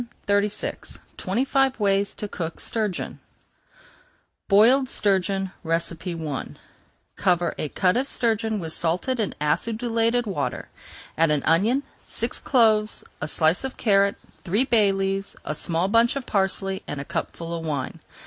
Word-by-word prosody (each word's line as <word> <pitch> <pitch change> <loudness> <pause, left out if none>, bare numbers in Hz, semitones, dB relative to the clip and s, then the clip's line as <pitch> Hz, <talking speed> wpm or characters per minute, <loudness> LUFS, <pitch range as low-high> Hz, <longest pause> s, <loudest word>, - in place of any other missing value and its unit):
[Page 205 0 +2
401] - - -4 0.2
TWENTY 255 +3 -1
FIVE 270 -2 +2
WAYS 200 -1 +1
TO 210 - -5
COOK 165 -4 -5
STURGEON 215 -5 -3 1.3
BOILED 245 +6 +5
STURGEON 195 -1 +1
I 165 -2 -2 0.7
Cover 175 -3 +2
a 150 - -2
cut 180 +4 +2
of 260 +3 0
sturgeon 225 -2 0
with 160 -3 -2
salted 180 +10 +1
and 215 - -1
acidulated 230 +8 +1
water. 185 -9 -3 0.5
Add 165 -1 +5
an 150 -2 +1
onion, 215 - +3 0.2
six - - -2
cloves, 220 -4 +2 0.2
a - - -2
slice 160 +5 +2
of 265 -1 -4
carrot, 200 -2 +3 0.3
three 200 +7 +2
bay 220 -6 +4
leaves, 195 0 -2
a - - -2
small 170 +3 -1
bunch 230 +4 +3
of 275 -3 -4
parsley, 195 -1 0
and 145 - -4
a 140 - -5
cupful 165 +4 -4
of 165 -1 -4
wine. 145 -5 -3
195 Hz, 140 wpm, -24 LUFS, 170-225 Hz, 1.3 s, BOILED